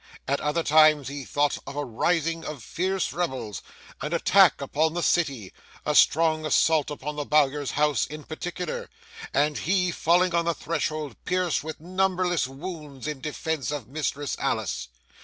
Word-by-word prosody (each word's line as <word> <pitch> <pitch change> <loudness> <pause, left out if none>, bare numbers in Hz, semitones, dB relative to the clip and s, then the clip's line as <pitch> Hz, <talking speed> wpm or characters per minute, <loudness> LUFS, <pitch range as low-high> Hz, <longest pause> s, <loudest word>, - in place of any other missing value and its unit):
At 140 +1 0
other 150 +3 0
times 155 -3 +5
he 140 -1 -6
thought 145 0 0
of - - -6
a 145 0 -2
rising 165 +7 0
of 145 -7 -6
fierce 185 - -1
rebels, 130 - -3 0.4
an 150 +3 -3
attack 180 -1 +5
upon 155 +4 0
the 175 - -1
city, 135 - 0 0.3
a - - +1
strong 160 0 +4
assault 155 -1 +3
upon 150 0 -5
the 145 - -1
Bowyer's 145 -1 +2
house 150 -4 +2
in 150 0 -8
particular, 180 - -5 0.4
and 150 0 +1
he 180 +1 +1
falling 175 +2 +2
on 170 0 +2
the 170 -1 +1
threshold 155 -4 -3
pierced 180 -4 0
with 160 0 -6
numberless 180 -2 0
wounds 145 -2 -8
in 150 -3 -4
defence 155 -2 -3
of 145 -6 -4
Mistress 145 0 -2
Alice. - - -1
155 Hz, 160 wpm, -26 LUFS, 145-170 Hz, 0.4 s, times